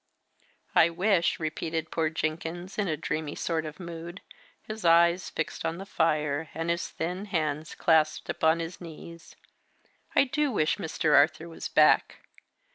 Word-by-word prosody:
"I 165 - +6
wish," 180 +1 +1
repeated 160 0 -3
poor 160 -1 +1
Jenkins 165 +4 -4
in 205 - +1
a 155 -3 -1
dreamy 155 0 -3
sort 160 -2 -2
of 155 +3 -9
mood, 170 +1 -8 0.4
his 215 0 -7
eyes 170 +1 +4
fixed 155 - -4
on 165 +1 -2
the 195 - -7
fire, 155 -4 0
and 165 +1 -1
his 170 0 -2
thin 180 +5 -4
hands 155 -5 -2
clasped 155 -2 +2
upon 160 +1 +2
his 165 +2 -7
knees: 170 0 -11 0.8
"I - - +6
do 280 +1 0
wish 155 -8 +1
Mr. 160 -4 +1
Arthur 155 +3 +4
was 165 - -6
back. - - +3
165 Hz, 150 wpm, -28 LUFS, 155-175 Hz, 0.8 s, I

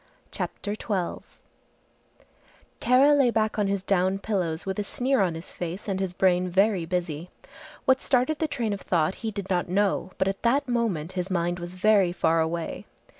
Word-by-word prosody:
CHAPTER 205 - -4
XII 200 -4 -3 1.6
Kara 265 +4 +5
lay 275 -4 +4
back 220 -2 0
on 205 - +2
his 195 -1 -1
down 190 0 +2
pillows 185 -6 -2
with 190 +1 -3
a - - 0
sneer 255 +4 0
on 175 -4 +1
his 165 +2 -7
face 175 +4 -6
and 195 -2 -1
his 190 -2 -3
brain 180 -1 +2
very 190 -1 +2
busy. 175 -2 -3 0.6
What 260 -1 +4
started 270 +4 +1
the 315 - +1
train 235 -7 -2
of 200 - -5
thought 165 -1 +1
he 225 - -2
did 200 -2 -5
not 180 -1 0
know, 190 0 0
but 190 - +1
at 195 0 -2
that 270 +4 +2
moment 220 -10 -1
his 185 0 -3
mind 175 -1 -1
was 175 +1 -7
very 195 -1 +4
far 165 -2 +2
away. 165 +1 -3
190 Hz, 180 wpm, -26 LUFS, 175-220 Hz, 1.6 s, Kara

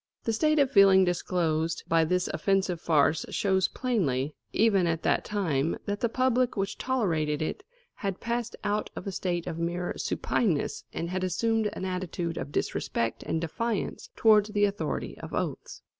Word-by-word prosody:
The 225 - 0
state 305 +7 +2
of 280 -2 +3
feeling 195 -4 +7
disclosed 165 -2 0
by 165 0 +3
this 180 +2 +1
offensive 195 -3 0
farce 155 -1 +3
shows 190 -2 +2
plainly, 155 - -1 0.2
even 200 -5 +3
at 165 -1 -1
that - - +2
time, 165 -8 0
that 205 0 -2
the 235 - +1
public 255 0 +1
which 195 0 -2
tolerated 165 - 0
it 155 - -3 0.4
had 195 -2 -3
passed 235 0 -2
out 210 0 -1
of - - -6
a 195 - -3
state 175 -2 -2
of 165 - -4
mere 175 +1 -2
supineness 180 -11 -1
and 170 +1 -4
had 185 0 -2
assumed 220 +4 +1
an - - -5
attitude 180 -2 -3
of 135 +2 -5
disrespect 115 -4 -1
and 160 - -2
defiance 210 +6 -3
towards 215 -2 +5
the 205 -1 +3
authority 200 +1 -3
of - - -6
oaths. - - -4
190 Hz, 165 wpm, -28 LUFS, 165-220 Hz, 0.4 s, feeling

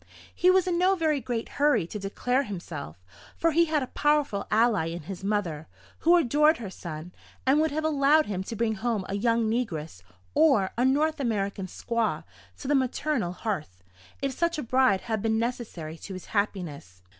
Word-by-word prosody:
He 360 - +3
was 370 -1 +5
in 350 -2 0
no 375 +2 +4
very 310 -5 +1
great 230 -1 -3
hurry 285 - +2
to 210 +5 -6
declare 245 +6 0
himself; 155 - -7 0.3
for 330 - +2
he 335 +2 +4
had 310 -3 0
a 255 - -9
powerful 295 -9 +1
ally 220 -6 +3
in 170 0 -5
his 190 +4 -7
mother, 180 -7 -2 0.3
who 340 +2 +5
adored 300 +1 +4
her 210 -6 -7
son, 170 -1 -7 0.3
and 270 +3 +4
would 315 - +2
have 310 +2 -2
allowed 305 0 +4
him 190 -2 -3
to 230 - -5
bring 225 0 0
home 220 -2 -2
a - - -4
young 230 +2 +1
negress, 170 - -3 0.3
or 275 -12 +4
a 245 - +2
North 300 +4 +2
American 200 -6 -1
squaw, 230 +4 -2 0.3
to 270 - -8
the 290 - +2
maternal 260 - 0
hearth, 155 - -5 0.4
if 275 - +1
such 340 +3 0
a 300 - -3
bride 255 -5 +3
had 220 -3 -2
been 220 0 +1
necessary 220 -9 -4
to 195 - -8
his 185 - -8
happiness. 160 - -3
230 Hz, 185 wpm, -27 LUFS, 190-290 Hz, 0.4 s, was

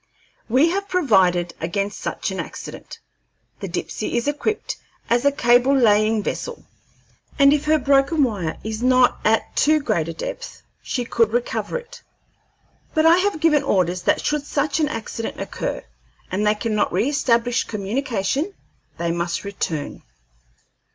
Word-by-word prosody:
We 265 +8 +4
have 395 +3 -2
provided 190 - +2
against 195 +5 -2
such - - -3
an - - -5
accident. - - -8 0.6
The - - -5
Dipsey - - -4
is 235 - -1
equipped 295 +9 -2 0.3
as 240 +3 +2
a 285 - +5
cable 250 +1 +4
laying 215 -2 +3
vessel, 480 - -5 0.7
and 280 -1 +6
if 300 0 0
her 310 +1 +4
broken 280 +2 +3
wire 195 -10 -2
is 220 +1 -4
not 255 0 +4
at 220 +1 +1
too 310 +1 +4
great 215 - -1
a 165 - -4
depth, - - -7 0.2
she 245 -2 -3
could 230 -2 +2
recover 240 - -1
it; 485 0 -11 0.9
but 315 0 +3
I 330 +2 +7
have 390 -3 0
given 300 -2 +4
orders 185 - +1
that - - +1
should 300 -1 0
such 290 +2 0
an 305 - +2
accident 225 0 -5
occur, - - -4 0.5
and 205 +3 0
they 210 - +3
cannot 215 -1 0
reestablish 245 -3 +1
communication, 235 - -2 0.4
they 170 0 -1
must 170 0 -2
return." 170 -7 -4
245 Hz, 145 wpm, -22 LUFS, 205-295 Hz, 0.9 s, I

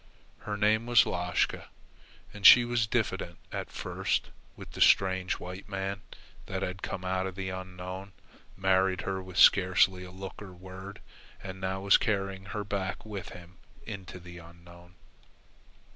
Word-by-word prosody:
Her 105 -1 -4
name 110 +2 +2
was 120 -1 +6
Lashka, 90 -1 -1 0.7
and 100 - -10
she 120 +4 +10
was 120 -2 0
diffident 95 -6 -2
at - - -4
first - - -2 0.2
with - - -11
the - - -7
strange 95 -1 +4
white 90 +3 -8
man 100 0 -3 0.5
that 95 0 -3
had 90 +1 -4
come 95 - -5
out 95 0 0
of 95 - -7
the 95 -1 -4
Unknown, 95 +1 -7 0.4
married 95 -1 +2
her 95 -1 -3
with 95 -1 -10
scarcely 95 -1 +5
a 90 - -9
look 95 +1 -9
or 95 -3 -9
word, 95 +2 -10 0.4
and 95 0 -7
now 95 0 -2
was 100 0 +6
carrying 95 -3 -2
her 105 +1 -4
back 95 -2 -4
with 100 -4 -6
him 90 +1 -13 0.3
into 95 -4 -8
the 85 0 -11
Unknown. 85 +1 -16
95 Hz, 155 wpm, -29 LUFS, 90-100 Hz, 0.7 s, she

